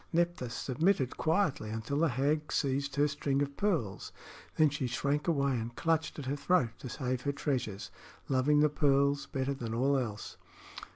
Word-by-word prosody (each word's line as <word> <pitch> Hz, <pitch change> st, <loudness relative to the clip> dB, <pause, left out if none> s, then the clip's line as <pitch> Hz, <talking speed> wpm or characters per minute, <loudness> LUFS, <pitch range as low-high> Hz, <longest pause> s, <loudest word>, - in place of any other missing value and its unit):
Nephthys 170 Hz, -8 st, 0 dB
submitted 140 Hz, +1 st, +1 dB
quietly 160 Hz, -, 0 dB
until 110 Hz, +6 st, -2 dB
the 165 Hz, 0 st, +3 dB
hag 145 Hz, +4 st, 0 dB
seized 140 Hz, 0 st, 0 dB
her 145 Hz, +1 st, +3 dB
string 140 Hz, -1 st, 0 dB
of 140 Hz, 0 st, -5 dB
pearls; 160 Hz, -, -1 dB, 0.4 s
then 155 Hz, -2 st, +4 dB
she 140 Hz, -2 st, -2 dB
shrank 140 Hz, +5 st, -1 dB
away 140 Hz, -4 st, +2 dB
and 120 Hz, -1 st, -3 dB
clutched 160 Hz, -1 st, 0 dB
at 145 Hz, -, -5 dB
her 135 Hz, +2 st, -1 dB
throat 155 Hz, -5 st, +2 dB
to 130 Hz, -, -7 dB
save 130 Hz, -1 st, -2 dB
her 140 Hz, -, 0 dB
treasure, 130 Hz, -8 st, -2 dB, 0.5 s
loving 140 Hz, +3 st, +3 dB
the 150 Hz, -, +5 dB
pearls 140 Hz, -1 st, +2 dB
better 135 Hz, 0 st, -2 dB
than 115 Hz, -4 st, -4 dB
all 135 Hz, +4 st, +2 dB
else. 110 Hz, -5 st, -5 dB
140 Hz, 170 wpm, -31 LUFS, 130-150 Hz, 0.5 s, the